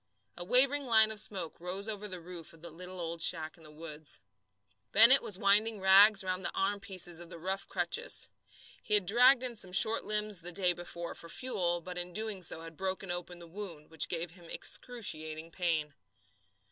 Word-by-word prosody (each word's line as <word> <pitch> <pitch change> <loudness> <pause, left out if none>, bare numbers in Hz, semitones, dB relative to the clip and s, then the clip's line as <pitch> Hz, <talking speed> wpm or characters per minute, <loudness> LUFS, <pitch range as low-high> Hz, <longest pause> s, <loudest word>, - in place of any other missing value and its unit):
A 175 - -7
wavering 260 +7 +2
line 220 -2 +4
of 215 - -2
smoke 185 -6 -3
rose 185 +4 -5
over 210 -1 -5
the 185 -3 -7
roof 170 -1 -10
of 165 0 -19
the 170 - -8
little 180 +3 -9
old 165 -1 -5
shack 160 -2 +1
in 165 - -19
the 155 - -15
woods. 155 -1 -7 0.7
Bennett 235 +6 +7
was 195 - -1
winding 210 +2 +2
rags 195 +2 +6
round 185 0 -3
the - - -3
armpieces 195 -4 -2
of 170 - -10
the 170 - -9
rough 190 +4 -4
crutches. 475 +2 0 0.5
He 210 - +1
had 205 -3 +4
dragged 245 +6 +5
in 245 -2 -3
some 185 -4 -2
short 220 +4 +6
limbs 210 -3 0
the 175 +2 -4
day 180 0 +2
before 170 0 -6
for 170 - -8
fuel, 175 -7 0
but 180 +1 -6
in 175 - -3
so 180 - -16
doing 215 -2 -3 0.2
had 165 0 -10
broken 190 +1 -3
open 175 0 -5
the 170 - -11
wound, 170 -4 -9
which 160 - +2
gave 170 -1 -4
him 175 0 -16
excruciating 160 -9 -2
pain. 160 -4 -2
185 Hz, 195 wpm, -31 LUFS, 170-210 Hz, 0.7 s, Bennett